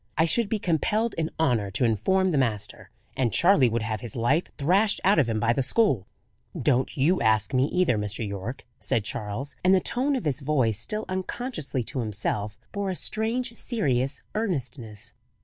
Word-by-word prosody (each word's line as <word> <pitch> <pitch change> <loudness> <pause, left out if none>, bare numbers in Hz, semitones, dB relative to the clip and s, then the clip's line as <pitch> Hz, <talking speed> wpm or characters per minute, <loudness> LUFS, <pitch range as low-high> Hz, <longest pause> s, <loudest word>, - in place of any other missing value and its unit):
"I 160 - +4
should 215 +5 +2
be 220 - 0
compelled 210 +5 0
in 160 -1 -1
honour 120 -10 +1
to 110 +6 0
inform 190 - +2
the 155 - 0
master, 105 -5 -2 0.3
and 125 -4 +1
Charley 160 - +5
would 115 0 -1
have 110 -1 -3
his 120 -4 -7
life 130 +9 +1
thrashed 190 +9 +2
out 195 -2 +4
of 130 -6 +2
him 110 -1 0
by 115 +2 +2
the 135 - 0
school." 130 - +2 0.5
"Don't 130 +3 +1
you 165 +7 +2
ask 110 -2 +2
me, 130 +1 +3
either, 170 -9 +1
Mr. 105 +2 -2
Yorke," 100 +6 -6
said 115 - 0
Charles; 115 +8 -4
and 185 +1 +5
the - - +4
tone 265 +9 0
of 250 - -3
his 145 -2 0
voice, 130 -7 +1
still 215 - -3
unconsciously 185 - -3
to 130 +4 -4
himself, 105 -1 -3
bore 200 -1 -2
a 185 - -2
strange 230 +5 -1
serious 135 - -1
earnestness. 135 - -4
135 Hz, 185 wpm, -26 LUFS, 115-190 Hz, 0.5 s, Charley